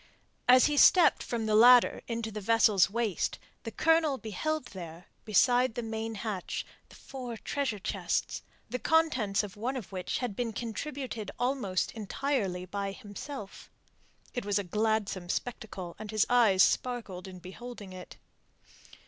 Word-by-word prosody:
As 255 0 +7
he 295 -1 +1
stepped 355 +4 +6
from 230 -2 -3
the 215 - 0
ladder 240 +3 +7
into 230 -1 -3
the 210 0 -6
vessel's 210 -3 +4
waist, 220 -3 -1 0.2
the 225 - -5
Colonel 320 +1 +2
beheld 260 +7 -3
there, 170 -2 -9 0.2
beside 245 +2 +3
the 240 - -3
main 225 0 -4
hatch, 205 -3 -4 0.2
the - - -15
four 250 -4 -7
treasure 270 -2 -2
chests, 190 - -2 0.3
the 250 +3 -4
contents 255 -13 +2
of 200 -3 -8
one 245 +6 -3
of 225 -7 -8
which 185 -2 -3
had 245 -6 -3
been 235 -1 -2
contributed 235 -1 -5
almost 245 -8 -1
entirely 210 -4 -2
by 200 +1 -4
himself. 210 +1 -9 0.6
It 245 - -3
was 205 0 0
a 205 - 0
gladsome 210 -2 -1
spectacle, 200 -7 -4
and 215 -1 -7
his 215 0 +2
eyes 220 -6 +5
sparkled 220 -8 -1
in 185 -1 -9
beholding 195 +2 -9
it. 185 -1 -10
220 Hz, 150 wpm, -30 LUFS, 195-250 Hz, 0.6 s, As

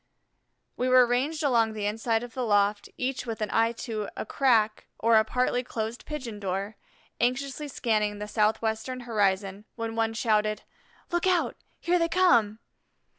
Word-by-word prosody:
We 255 - 0
were 255 -1 +7
ranged 275 +7 -1
along 230 -5 +2
the 210 -1 -4
inside 225 +2 0
of 240 -1 -9
the 255 - -2
loft, 205 -2 +1
each 255 0 -3
with 225 -1 -4
an 215 -1 -2
eye 230 0 +3
to 215 -3 -3
a - - -3
crack 220 -4 +2
or 230 +1 +3
a 220 - +5
partly 250 +2 0
closed 225 0 -5
pigeon 255 -8 -6
door, 195 +2 -3 0.4
anxiously 270 +4 -1
scanning 215 -6 0
the 210 0 -5
southwestern 220 +4 0
horizon, 200 -3 0
when 230 -1 -4
one 225 0 0
shouted: 215 -2 +1 0.5
"Look 345 +1 +1
out 360 -2 +2 0.3
here 355 +1 +2
they 335 0 +1
come!" 235 - +3
225 Hz, 160 wpm, -27 LUFS, 215-255 Hz, 0.5 s, were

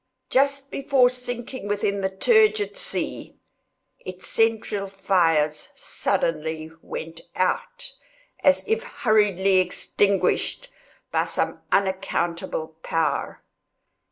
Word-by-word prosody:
Just 275 +1 +1
before 270 -3 +3
sinking 245 -2 -5
within 200 -1 0
the 190 - 0
turgid 430 - +3
sea, - - -2 0.6
its 185 0 -9
central 220 -3 +1
fires 170 -6 +1
suddenly 160 0 -2
went 165 +1 -7
out, 485 - -1 0.5
as 280 -1 +4
if 445 +2 +1
hurriedly 210 - +2
extinguished 200 - +1 0.4
by - - +1
some - - -2
unaccountable 175 -4 -1
power. 155 -4 -1
200 Hz, 90 wpm, -24 LUFS, 175-260 Hz, 0.6 s, as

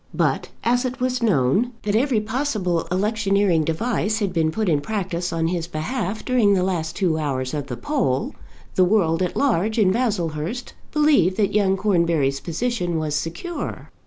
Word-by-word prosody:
But - - 0
as 245 +2 +2
it 255 +1 -3
was 255 0 0
known 205 - +2
that 205 0 0
every 245 0 +2
possible 215 - -1
electioneering 200 -3 +2
device 215 +6 0
had 205 -4 -1
been 160 -2 +2
put 215 +6 -2
in 150 -4 +2
practice 180 -2 -3
on 165 -1 0
his 170 -2 -2
behalf 195 +6 -3
during 230 -6 +3
the 180 - +1
last 170 -4 -2
two 175 -5 +1
hours 130 -4 -2
of 145 -2 -3
the 125 - -5
poll, 245 - -1 0.4
the 185 - +4
world 180 -4 +2
at 180 - -1
large 220 -5 +1
in 200 -4 +4
Baslehurst 200 -2 -2 0.2
believed 285 - +3
that 205 -2 +1
young 195 -2 +2
Cornbury's 170 -8 +1
position 175 - -2
was 155 -2 -2
secure. 170 - -4
190 Hz, 165 wpm, -22 LUFS, 165-225 Hz, 0.4 s, the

